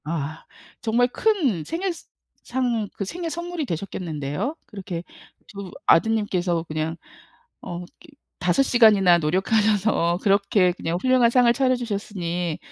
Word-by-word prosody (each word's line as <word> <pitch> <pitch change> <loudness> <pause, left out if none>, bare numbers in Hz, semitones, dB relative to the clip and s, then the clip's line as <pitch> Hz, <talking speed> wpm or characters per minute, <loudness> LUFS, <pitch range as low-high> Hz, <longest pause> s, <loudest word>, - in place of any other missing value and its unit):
아. 155 -1 -4 0.4
정말 240 +2 +2
큰 270 - 0
생일 360 - -2
상 335 - -17 0.8
그 200 - -2
생일 340 - -4
선물이 340 0 -4
되셨겠는데요? 170 - -4
그렇게 185 -5 -6 0.4
2 200 -2 -9
아드님께서 185 -5 +2
그냥 155 0 -3 0.7
어 175 0 -6
그 - - -12 0.5
5 180 +9 +2
시간이나 210 -9 +5
노력하셔서 190 +1 +1
그렇게 200 -2 +3
그냥 170 -1 -3
훌륭한 255 0 +4
상을 245 -1 +4
차려 255 +1 +2
주셨으니 185 -8 -3
200 Hz, 265 characters per minute, -23 LUFS, 175-245 Hz, 0.8 s, 시간이나